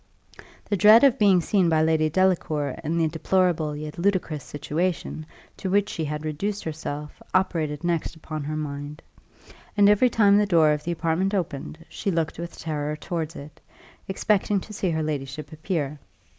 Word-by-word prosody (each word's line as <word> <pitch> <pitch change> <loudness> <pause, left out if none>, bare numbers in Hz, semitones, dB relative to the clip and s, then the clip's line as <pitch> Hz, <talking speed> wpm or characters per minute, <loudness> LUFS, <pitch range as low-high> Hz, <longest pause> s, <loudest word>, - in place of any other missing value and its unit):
The 205 - 0
dread 215 +5 +7
of 275 -4 +5
being 195 -4 +5
seen 185 0 +2
by 160 -1 +3
Lady 160 -1 +2
Delacour 155 -5 +1
in 165 +2 -1
the 165 -1 +2
deplorable 165 -1 +1
yet 150 +2 -7
ludicrous 170 -6 0
situation 155 +1 -3 0.3
to 190 - -4
which 205 +2 +2
she 160 - -3
had 150 +1 -4
reduced 195 +7 -3
herself 150 -2 -6
operated 160 -5 0
next 170 -1 -1
upon 155 -1 -6
her 155 +1 -3
mind, 145 0 -6 0.7
and 200 -1 +6
every 210 +5 +5
time 205 -3 +4
the 210 - +2
door 165 -5 +5
of 150 0 -1
the 175 - -2
apartment 170 +4 0
opened, 165 -2 -4
she 205 - -4
looked 165 -3 -1
with 170 0 -6
terror 150 -2 -3
towards 165 +1 -4
it, 145 +2 -11 0.5
expecting 200 +1 +1
to 215 - -10
see 190 -2 -1
her 160 -1 -1
ladyship 145 -1 -4
appear. 155 -3 -3
160 Hz, 170 wpm, -25 LUFS, 150-190 Hz, 0.7 s, dread